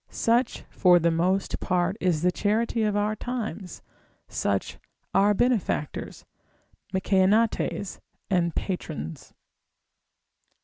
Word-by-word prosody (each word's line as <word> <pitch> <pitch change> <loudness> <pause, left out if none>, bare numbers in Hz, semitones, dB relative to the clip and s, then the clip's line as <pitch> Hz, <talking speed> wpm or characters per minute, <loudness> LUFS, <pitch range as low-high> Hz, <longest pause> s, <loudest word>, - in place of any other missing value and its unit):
Such 235 +3 +1
for 180 -2 +5
the 170 0 +2
most 185 +4 0
part 180 0 0
is 175 -4 +1
the 180 - +4
charity 225 +4 0
of 210 -1 +1
our 210 +1 +1
times, 220 -5 -5 0.4
such - - -2 0.3
our 205 +1 +4
benefactors, 230 - -1 0.7
Mecaenates 195 +1 +1 0.3
and 170 -4 +1
patrons. 80 - -5
195 Hz, 95 wpm, -26 LUFS, 180-215 Hz, 0.7 s, for